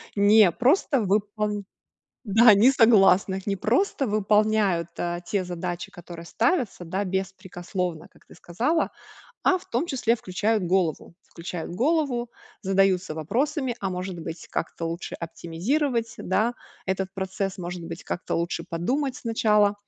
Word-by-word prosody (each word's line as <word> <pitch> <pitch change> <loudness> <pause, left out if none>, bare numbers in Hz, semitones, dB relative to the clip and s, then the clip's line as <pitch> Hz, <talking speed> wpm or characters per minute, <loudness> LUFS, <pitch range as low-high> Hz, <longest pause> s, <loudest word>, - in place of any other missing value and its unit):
не 205 -2 +6
просто 265 - +2
выпол 205 +1 -1 0.6
да, 220 +2 +7
не 225 +7 +6
согласных. 195 -4 +4
Не 200 - +1
просто 265 - +1
выполняют, 210 -4 +2
а, 175 0 -2
те 185 +1 -2
задачи, 175 0 -5
которые 170 -1 -10
ставятся, 235 - 0
да, 190 +4 -2
беспрекословно, 180 -2 -4
как - - -24
ты - - -16
сказала. 235 - -1 0.5
А 370 - +3
в - - -18
том 245 +9 -1
числе 240 -6 +1
включают 210 +2 -1
голову. 170 -3 0
Включают 170 0 -7
голову, 250 - 0 0.3
задаются 190 -3 +2
вопросами: 260 - -1
"А 195 -1 -2
может 180 -1 -5
быть, 160 0 -7
как-то 165 - -3
лучше 170 +2 -5
оптимизировать, 225 - -2
да, 220 +6 0 0.3
этот 190 0 -2
процесс? 190 0 -3
Может 175 -1 -5
быть, 165 0 -8
как-то - - -3
лучше 170 +1 -2
подумать 255 - -1
сначала?" 210 -3 +2
195 Hz, 135 wpm, -25 LUFS, 175-230 Hz, 0.6 s, да